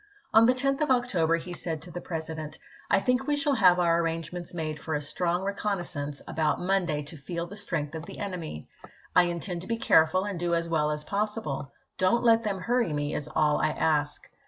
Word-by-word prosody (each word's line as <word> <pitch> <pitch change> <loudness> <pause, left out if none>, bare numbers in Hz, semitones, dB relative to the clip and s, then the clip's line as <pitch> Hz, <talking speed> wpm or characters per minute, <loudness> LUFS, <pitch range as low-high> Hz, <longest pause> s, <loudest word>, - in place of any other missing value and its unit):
On 225 +1 +7
the 255 - +4
10th 275 +3 0
of 300 - +1
pS 260 - +7
October 180 -10 +1
he 175 +1 -7
said 165 -2 -3
to 175 - -10
the 175 +2 -6
President: 160 -2 -5 0.2
" - - -24
I - - +5
think 250 +5 +1
we 295 - +2
shall 290 0 +1
have 185 -7 +5
our 170 -1 +3
arrangements 165 +1 -3
made 155 -3 -4
for 155 +1 -3
a - - 0
strong 175 +5 -1
reconnaissance 175 -8 -3
about 155 -1 0
Monday 175 -5 0
to 150 +3 -8
feel 170 +4 -4
the 190 +4 -10
strength 170 -8 -3
of 160 0 -6
the - - -9
enemy. 175 - -5 0.5
I 180 - +7
intend 175 0 -3
to 185 - -9
be 230 - -1
careful 160 -3 +4
and 200 -4 -4
do 170 0 +1
as 170 0 -1
well 155 -2 +1
as 150 0 -2
possible. 200 - -2 0.3
Don't 185 +6 +3
let 230 -1 +5
them 200 -4 -2
hurry 240 -3 +1
me, 145 0 -1
is 150 - -3
all 150 -1 +3
I 155 - +3
ask." 150 -1 0
175 Hz, 220 wpm, -28 LUFS, 155-200 Hz, 0.5 s, On